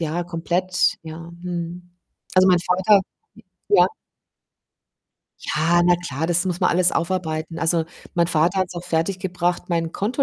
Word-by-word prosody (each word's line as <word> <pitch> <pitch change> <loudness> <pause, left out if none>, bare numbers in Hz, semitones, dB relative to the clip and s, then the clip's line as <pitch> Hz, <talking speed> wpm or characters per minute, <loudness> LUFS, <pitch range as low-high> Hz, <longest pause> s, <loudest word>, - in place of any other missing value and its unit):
ja, 165 +2 -2
komplett, 175 +2 0
ja. 160 0 -8 0.2
Mhm. 175 0 -6 0.4
Also, 185 0 +6
mein 180 -1 +5
Vater 190 +3 +3 0.3
hm, - - -17 0.3
ja. 410 - +6 1.5
Ja, 170 +3 +2
na 175 0 +5
klar, 160 -3 -4
das 175 +1 +2
muss 180 -1 -2
man 180 - +3
alles 180 0 +4
aufarbeiten. 165 -2 -2
Also, 165 0 +2 0.3
mein 170 -1 +2
Vater 170 +3 +2
hat's 185 -1 -2
auch 175 - -5
fertiggebracht, 175 +1 -2
mein 165 -2 -1
Konto 230 +7 -1
175 Hz, 145 wpm, -22 LUFS, 165-180 Hz, 1.5 s, Also